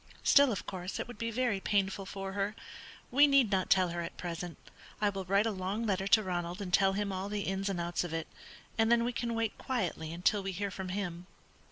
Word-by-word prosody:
Still, 280 -2 +6
of 200 - -3
course, 185 0 -5
it - - -3
would 240 -3 -10
be 230 - -1
very 235 -3 0
painful 195 -1 0
for 195 -1 -5
her. 200 +2 -1 0.6
We 285 +4 +7
need 275 -6 +4
not 190 -2 +1
tell 185 -2 +4
her 170 0 -3
at 170 - -6
present; 175 -1 -5 0.4
I 210 - +3
will 195 -1 -4
write 200 +3 +3
a 225 - +1
long 195 +4 -2
letter 195 -2 0
to 215 +2 +5
Ronald 175 0 -3
and 185 -3 -5
tell 195 0 +5
him 200 0 -1
all 190 +1 -3
the 205 0 -2
ins 195 0 -1
and 190 -3 -2
outs 170 +1 -1
of 175 - -5
it, 165 0 -2 0.5
and 225 +1 +4
then 235 0 +5
we 245 +1 -1
can 235 +1 -2
wait 225 -1 -1
quietly 180 - -2
until 180 +4 +1
we 195 0 -3
hear 200 +2 -2
from 190 -1 -5
him." 180 -2 -4
195 Hz, 235 wpm, -32 LUFS, 185-215 Hz, 0.6 s, We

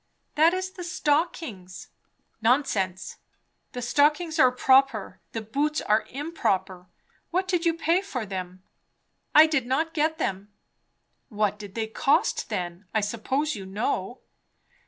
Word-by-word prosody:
"That 320 +4 +4
is 370 0 -3
the 360 - -8
stockings." 295 - -2 0.5
"Nonsense! 220 -7 0 0.6
The 245 - -5
stockings 300 +6 +2
are 255 -3 +6
proper; 260 -4 +2
the 225 - -3
boots 290 +8 -1
are 215 +1 +1
improper. 205 - -2 0.4
What 370 +2 0
did 355 -2 +1
you 330 - +2
pay 335 +2 +2
for 265 - -5
them?" 185 -1 -6 0.7
"I 305 +1 +10
did 305 -6 0
not 320 +6 0
get 315 0 +1
them." 195 +2 -3 0.8
"What 210 -2 -1
did 205 -2 -10
they 225 -1 -1
cost, 280 - +1
then? 175 +2 -4
I 215 - +3
suppose 260 +8 -1
you 195 -2 -8
know." 200 +2 -3
255 Hz, 135 wpm, -26 LUFS, 205-315 Hz, 0.8 s, I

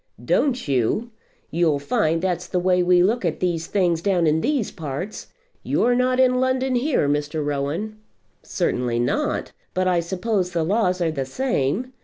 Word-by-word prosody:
"Don't 255 - +1
you? 140 - 0 0.4
You'll 160 -2 +2
find 165 - 0
that's 180 -1 -1
the 185 - -2
way 180 0 +2
we 180 0 +4
look 220 +5 +1
at 170 -3 -1
these 170 -3 -1
things 175 -5 +1
down 180 -3 +2
in 155 +1 +2
these 275 - 0
parts. 160 +5 -6 0.3
You're 245 - +1
not 255 +1 +1
in 255 -1 +4
London 260 0 +1
here, 250 - +1
Mr. 150 +1 -1
Rowan." 150 +10 -3 0.4
"Certainly 120 -1 -1
not; 120 - -1 0.2
but 185 0 +1
I 180 -1 +3
suppose 185 +1 -1
the 165 -1 +1
laws 185 0 +1
are 165 -2 +1
the 135 -4 -3
same. 240 - -1
180 Hz, 165 wpm, -22 LUFS, 155-230 Hz, 0.4 s, we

